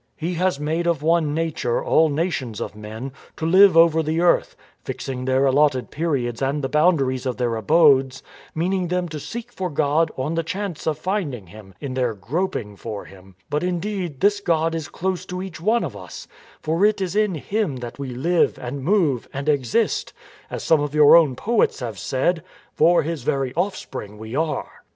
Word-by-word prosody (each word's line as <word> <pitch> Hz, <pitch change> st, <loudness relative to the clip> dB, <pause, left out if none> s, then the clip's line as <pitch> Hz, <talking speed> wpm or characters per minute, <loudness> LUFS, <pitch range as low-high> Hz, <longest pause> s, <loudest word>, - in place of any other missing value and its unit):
He 170 Hz, +3 st, -3 dB
has 180 Hz, -3 st, 0 dB
made 160 Hz, +3 st, -1 dB
of 165 Hz, -4 st, 0 dB
one 160 Hz, -2 st, +2 dB
nature 160 Hz, -7 st, -1 dB
all 160 Hz, 0 st, +4 dB
nations 145 Hz, -, -2 dB
of -, -, -5 dB
men, 110 Hz, +5 st, -7 dB, 0.3 s
to 160 Hz, -, -3 dB
live 185 Hz, +1 st, +6 dB
all 165 Hz, -, +10 dB
over 160 Hz, -1 st, +1 dB
the 160 Hz, +1 st, -1 dB
earth, 175 Hz, 0 st, +2 dB, 0.3 s
fixing 130 Hz, -1 st, -5 dB
their 130 Hz, +1 st, +2 dB
allotted 135 Hz, -1 st, +2 dB
periods 135 Hz, -7 st, -2 dB
and 140 Hz, +2 st, -1 dB
the 135 Hz, -, -1 dB
boundaries 135 Hz, -4 st, +2 dB
of 125 Hz, -, -2 dB
their 120 Hz, -2 st, 0 dB
abodes, 135 Hz, +1 st, +3 dB, 0.3 s
meaning 180 Hz, +3 st, 0 dB
them 180 Hz, 0 st, -1 dB
to 155 Hz, -1 st, -6 dB
seek 235 Hz, -, -7 dB
for 190 Hz, -6 st, -3 dB
God 150 Hz, +2 st, +1 dB
on 135 Hz, +5 st, -2 dB
the 165 Hz, -, 0 dB
chance 185 Hz, 0 st, -5 dB
of 155 Hz, -2 st, 0 dB
finding 155 Hz, -, -3 dB
Him, 95 Hz, +1 st, -14 dB
in 140 Hz, -3 st, -5 dB
their 125 Hz, -3 st, 0 dB
groping 115 Hz, -, -3 dB
for 105 Hz, -2 st, -6 dB
Him, 95 Hz, -1 st, -16 dB
But 150 Hz, +1 st, -1 dB
indeed 180 Hz, -4 st, -3 dB
this 205 Hz, +1 st, +3 dB
God 165 Hz, -3 st, +1 dB
is 160 Hz, -3 st, -3 dB
close 185 Hz, -1 st, -3 dB
to 180 Hz, 0 st, -5 dB
each 185 Hz, -3 st, -7 dB
one 225 Hz, +6 st, +2 dB
of 135 Hz, -11 st, -5 dB
us, 90 Hz, -3 st, -9 dB, 0.4 s
for 165 Hz, +5 st, 0 dB
it 210 Hz, 0 st, +3 dB
is 190 Hz, 0 st, -3 dB
in 210 Hz, -4 st, +2 dB
Him 195 Hz, 0 st, -2 dB
that 125 Hz, +1 st, -8 dB
we 140 Hz, -2 st, -4 dB
live 170 Hz, +7 st, +1 dB
and 130 Hz, +2 st, -5 dB
move 160 Hz, -, +1 dB
and 140 Hz, +2 st, -5 dB
exist; 145 Hz, -, 0 dB, 0.4 s
as -, -, -5 dB
some 160 Hz, -2 st, +3 dB
of 145 Hz, 0 st, -3 dB
your 150 Hz, 0 st, +8 dB
own 155 Hz, -6 st, +5 dB
poets 225 Hz, -, +1 dB
have 115 Hz, -6 st, -5 dB
said: 160 Hz, +6 st, 0 dB
" -, -, -24 dB
* -, -, -39 dB
For 170 Hz, +2 st, +4 dB
his 160 Hz, -1 st, -3 dB
very 135 Hz, +1 st, -1 dB
offspring 165 Hz, -, -4 dB
we 110 Hz, +2 st, -8 dB
are.' 160 Hz, +1 st, -1 dB
155 Hz, 195 wpm, -22 LUFS, 130-175 Hz, 0.4 s, all